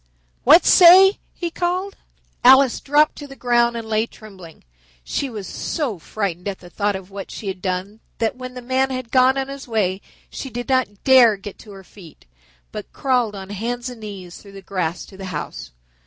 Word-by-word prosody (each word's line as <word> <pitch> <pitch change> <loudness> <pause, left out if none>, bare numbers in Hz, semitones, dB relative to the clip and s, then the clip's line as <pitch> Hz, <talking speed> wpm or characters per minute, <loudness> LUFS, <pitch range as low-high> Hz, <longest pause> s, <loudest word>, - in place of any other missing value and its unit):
What 310 +7 +7
say?" 380 +2 +7 0.2
he 345 -2 -4
called. 365 +3 -2 0.5
Alice 265 0 +6
dropped 295 +2 +2
to 290 - -8
the 275 - -12
ground 240 -2 +1
and 225 -1 -6
lay 220 +1 0
trembling. 190 -9 -14 0.4
She 275 - -3
was 210 -5 -7
so 250 - -4
frightened 180 0 -4
at 195 -2 -3
the 175 -1 -15
thought 205 +1 -1
of 190 0 -9
what 195 0 -8
she 210 - -8
had 185 -1 -6
done 185 +3 -4 0.2
that 225 +1 -1
when 255 0 -9
the 250 - -8
man 260 +2 0
had 255 -3 -5
gone 260 +1 +4
on 270 0 -2
his 275 -1 -9
way 200 -4 -1 0.3
she 270 - -6
did 245 0 -6
not 255 -7 -1
dare 250 -6 +6
get 195 0 -10
to 210 - -13
her 195 -1 -12
feet, 180 - -16 0.5
but - - -8
crawled 250 -6 0
on 195 0 -8
hands 240 +5 -4
and 235 -3 -12
knees 190 -4 -9
through 200 -1 -15
the 195 -1 -11
grass 180 -3 -3
to 190 - -15
the 190 - -8
house. 160 -5 -6
225 Hz, 200 wpm, -21 LUFS, 195-265 Hz, 0.5 s, What